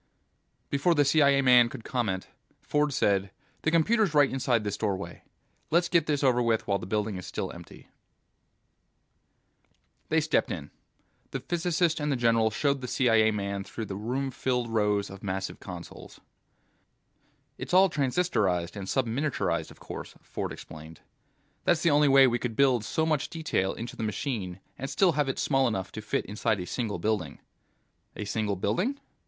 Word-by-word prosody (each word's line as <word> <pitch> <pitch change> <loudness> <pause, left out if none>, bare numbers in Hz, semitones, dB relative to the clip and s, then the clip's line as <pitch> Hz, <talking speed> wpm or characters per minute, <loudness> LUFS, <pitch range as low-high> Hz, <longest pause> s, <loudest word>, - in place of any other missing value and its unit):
Before 145 +5 +2
the 145 -1 +4
CIA 140 -1 +4
man 125 -2 +6
could 115 - -9
comment, 110 -8 -2 0.3
Ford 150 0 0
said, 100 -6 +1 0.3
"The - - +1
computer's 170 +2 +2
right 145 -2 +5
inside 125 -4 +1
this 105 -1 -2
doorway. 100 -3 -3 0.5
Let's 170 +1 +2
get 170 -1 +2
this 145 -2 0
over 125 -2 +3
with 115 -2 +1
while 100 -1 0
the 90 - -7
building 105 -1 -1
is 90 - -8
still - - -4
empty." - - -13 2.2
They - - +3
stepped - - +1
in. - - -6 0.6
The - - -4
physicist 170 -1 0
and 150 0 -1
the - - +2
general 115 -2 +3
showed 140 +5 0
the 125 - -5
CIA 115 -3 +3
man 100 -2 -2
through 110 +3 -6
the 95 - -6
room 130 +6 -2
filling 125 -2 -1
rows 105 -2 +1
of 95 0 -10
massive 95 0 -4
consoles. 90 -3 -10 1.4
"It's - - -6
all 190 +2 +6
transistorized 125 - 0
and 100 -2 -6
subminiaturized, 135 +5 -1
of - - -15
course," - - -8
Ford - - -4
explained. 80 +1 -11 0.6
"That's 170 -2 +2
the 170 - +4
only 145 0 +5
way 135 -1 +7
we 120 -1 +1
could 115 -2 -3
build 130 -4 +3
so 160 +8 0
much 155 -3 0
detail 155 - -1
into 115 +2 -6
the - - -6
machine 105 -4 -3 0.2
and 135 - -4
still 180 +6 +3
have 145 -3 0
it 135 - -2
small 135 -2 +2
enough 95 -5 -3
to 110 - -6
fit 105 - -2
inside 105 +1 -1
a 90 - -4
single 110 -1 -3
building." 90 -5 -2 0.8
"A 105 - -5
single 105 0 -1
building?" 180 - -1
120 Hz, 170 wpm, -28 LUFS, 105-145 Hz, 2.2 s, way